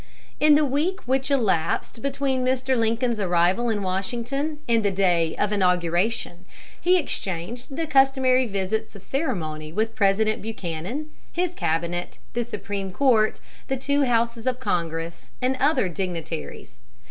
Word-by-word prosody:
In 300 0 +6
the 300 0 +4
week 305 +8 0
which 265 +2 0
elapsed 225 - 0
between 275 -2 0
Mr. 260 +1 +1
Lincoln's 230 0 +1
arrival 185 +5 +2
in 210 -3 -1
Washington 240 +11 -2
and 230 -2 +3
the 200 - +3
day 175 -4 +2
of 205 - 0
inauguration, 180 0 +1 0.4
he 365 +1 +5
exchanged 240 - -3
the 330 - -1
customary 265 -3 +4
visits 210 +2 -2
of 200 - -11
ceremony 155 - -3
with 220 +5 -1
President 215 +2 +2
Buchanan, 215 - -5 0.2
his 355 0 -1
cabinet, 170 - -2 0.2
the 240 - 0
Supreme 200 -4 -4
Court, 225 -2 +3 0.3
the 270 - -1
two 280 +2 +1
Houses 235 -1 0
of 255 -1 0
Congress, 165 -6 -3
and 255 +1 +1
other 285 -8 +3
dignitaries. 170 - -5
225 Hz, 135 wpm, -24 LUFS, 180-265 Hz, 0.4 s, In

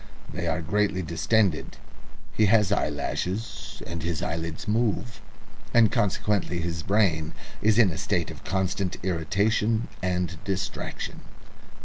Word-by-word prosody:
They 85 +1 -2
are 85 +1 0
greatly 100 +2 +1
distended, 85 +2 +1 0.6
he 110 - +4
has 105 -2 +4
eyelashes, 100 +3 -2
and 85 -1 -5
his 85 0 -2
eyelids 80 +3 -3
move, 115 +1 0 0.5
and 115 -3 +6
consequently 100 -3 +1
his 85 -1 -2
brain 85 -6 +1 0.3
is 105 0 +4
in 110 -6 +6
a 80 - -5
state - - 0
of - - -11
constant 95 0 -1
irritation 100 +6 +1
and 90 -3 -1
distraction." 95 0 -3
95 Hz, 120 wpm, -26 LUFS, 85-105 Hz, 0.6 s, and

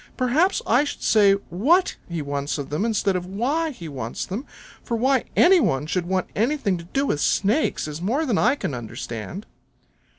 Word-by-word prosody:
Perhaps 280 +9 +2
I 245 +5 +4
should 295 - -6
say 205 -3 +5 0.2
WHAT 295 - +3
he 170 -3 -3
wants 140 +1 -3
of 145 -1 -6
them 155 +9 0
instead 205 -4 +1
of 180 0 -3
WHY 270 - -1
he 180 - -8
wants 125 -6 -5
them, 215 +9 -5 0.4
for 235 - -2
why 260 +2 +2
any 370 +1 +6
one 135 - +1
should 175 +2 -2
want 185 0 0
anything 230 -3 +1
to 170 - -10
do 270 +11 -1
with 145 - -1
Snakes 210 - +1
is 150 +2 -6
more 255 - 0
then 235 -8 +1
I 245 +5 +3
can 215 - -4
understand." 120 - -6
205 Hz, 190 wpm, -23 LUFS, 165-270 Hz, 0.4 s, any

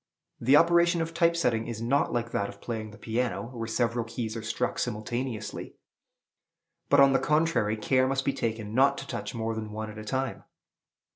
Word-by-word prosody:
The 130 +4 +4
operation 170 +1 +4
of 165 0 -6
type 170 0 +3
setting 115 -9 +1
is 115 -2 -5
not 125 +5 +1
like 120 -1 -2
that 100 - -1
of 100 - -12
playing 110 -1 -5
the 105 - -13
piano, 120 +1 -2
where 115 -2 -4
several 120 +1 0
keys 115 -1 -4
are 115 - -4
struck 115 +3 -2
simultaneously; 120 +1 -4 1.1
but, 140 - +5
on 140 -1 +7
the - - +4
contrary, 150 -9 +1
care 130 +4 +2
must 135 0 -1
be 140 - +1
taken 110 -4 -3
not 140 +3 +4
to - - -6
touch - - -5
more 115 0 -2
than 110 -1 -5
one 110 0 -5
at 105 - -9
a - - -7
time. 130 +4 -3
120 Hz, 195 wpm, -28 LUFS, 110-135 Hz, 1.1 s, on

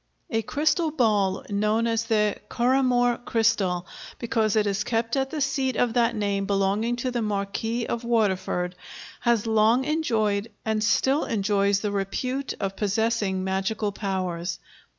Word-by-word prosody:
A 225 -1 +1
crystal 310 - +1
ball 210 -9 +1
known 215 +3 +1
as 225 -1 0
the 210 -2 +1
Currahmore 245 -1 +2
Crystal, 205 -7 +1 0.3
because 225 -3 0
it 215 -1 +3
is 200 0 0
kept 230 +2 -1
at 270 0 0
the 300 +1 -4
seat 270 -2 0
of 240 -1 +1
that 235 -1 +2
name 200 -2 -1
belonging 200 +4 +1
to 250 +1 -2
the 240 -1 -1
Marquis 215 +3 -2
of 235 0 -3
Waterford, 190 -6 0 0.5
has 235 -3 +1
long 225 +3 +3
enjoyed 225 -9 0 0.2
and 220 -1 0
still 265 +6 +2
enjoys 200 -2 +1
the 210 - -1
repute 250 +8 -2
of 195 0 -2
possessing 205 -2 0
magical 195 +3 -1
powers. 185 -3 -3
220 Hz, 145 wpm, -25 LUFS, 200-240 Hz, 0.5 s, it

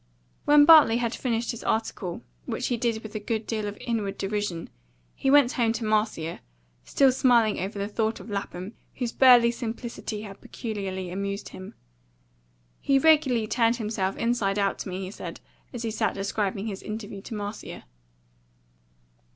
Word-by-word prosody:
When 290 0 +7
Bartley 305 -8 +8
had 235 -1 -1
finished 235 -2 -1
his 235 - -8
article, 215 -5 -2 0.2
which - - -2
he 245 - +1
did 230 -1 -1
with 220 - -9
a 215 - -3
good 220 +1 -3
deal 215 -2 -2
of 205 - -6
inward 220 -5 -2
derision, 195 -4 -3 0.4
he 270 - -1
went 280 -3 +6
home 230 -2 +1
to 225 0 -3
Marcia, 210 -7 0 0.4
still 270 - +3
smiling 245 -4 +3
over 200 +3 -4
the 200 0 -2
thought 220 +1 -1
of - - -11
Lapham, 200 -1 -5 0.2
whose 245 -3 -2
burly 245 -3 +6
simplicity 235 -2 -5
had 195 -2 -10
peculiarly 190 -5 -5
amused 200 +2 -4
him. 185 +2 -10 1.0
"He 275 - +2
regularly 270 -6 +4
turned 230 +1 +2
himself 210 -4 -2
inside 230 -4 0
out 200 -1 0
to - - -5
me," 185 +1 -4
he 185 - -7
said, - - -8 0.3
as 240 -2 -6
he 225 - -2
sat - - -1
describing 200 0 -2
his 200 -4 -5
interview 210 -2 -6
to 220 - -7
Marcia. 205 0 -6
220 Hz, 165 wpm, -26 LUFS, 200-235 Hz, 1.0 s, Bartley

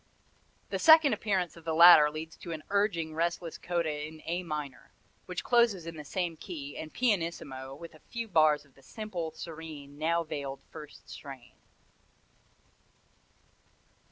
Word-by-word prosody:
The - - -1
second 315 -3 +7
appearance 190 -5 -1
of 170 - -14
the 160 -1 -2
latter 165 -3 +9
leads 160 +2 -7
to 170 - -8
an 155 -1 -7
urging, 200 -6 +1
restless 170 +1 -2
coda 160 -4 -2
in 155 0 -13
A 175 +2 -1
minor, 150 -6 -6 0.4
which - - -4
closes 235 -8 +3
in 165 0 -7
the 150 - -7
same 175 +2 -2
key 145 -6 -7
and 155 - -7
pianissimo 165 - -2
with 165 +3 -11
a 155 - -16
few 235 -1 -4
bars 155 -5 +3
of 135 - -26
the 135 - -21
simple, 185 -3 -5
serene, 155 -3 -9
now 170 +2 +1
veiled 140 -3 -5
first 150 -1 -11
strain." 135 -4 -10
160 Hz, 150 wpm, -30 LUFS, 150-175 Hz, 0.4 s, latter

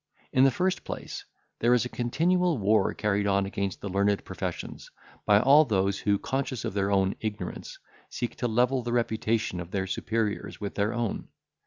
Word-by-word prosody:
In 130 +1 +6
the - - +6
first 185 +7 -1
place, - - -6 0.3
there 120 +2 +4
is 125 - +1
a - - -1
continual 170 +8 +1
war 105 +1 +3
carried 105 -1 0
on 100 0 +2
against 100 -1 -3
the - - -4
learned 100 +1 +1
professions, - - -6 0.4
by 105 -1 +6
all 140 +6 +7
those 100 -6 0
who, 100 -1 +2
conscious 130 +1 -3
of - - -3
their 100 0 0
own 95 -1 +2
ignorance, 105 -4 -5 0.3
seek 120 - -4
to 120 - -1
level 125 +3 +2
the 120 0 -3
reputation 110 -4 0
of 85 -1 -6
their 95 0 -2
superiors 110 +2 -2
with 100 -2 -4
their 105 +1 0
own. 120 -3 -3
110 Hz, 180 wpm, -27 LUFS, 100-125 Hz, 0.4 s, all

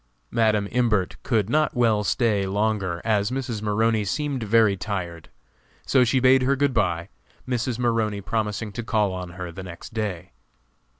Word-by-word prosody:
Madam 110 -3 +2
Imbert 115 -6 +1
could 110 -5 0
not 155 +5 +1
well 115 -4 +2
stay 105 -3 +1
longer 100 -3 -1
as 105 -2 +2
Mrs. 125 -4 -3
Maroney 110 +1 +1
seemed 140 +5 -2
very 110 -1 +3
tired. 90 -5 -5 0.6
So 130 -2 +4
she 125 +2 +2
bade 130 +1 +5
her 135 +2 +2
good 140 0 +1
bye, 90 -5 0 0.4
Mrs. 125 -1 -1
Maroney 115 -4 0
promising 105 0 -2
to 120 +4 -5
call 105 -4 +1
on 90 -1 -6
her 90 -2 -5
the 95 - -8
next 90 +3 -10
day. 100 -6 -4
110 Hz, 160 wpm, -24 LUFS, 100-120 Hz, 0.6 s, bade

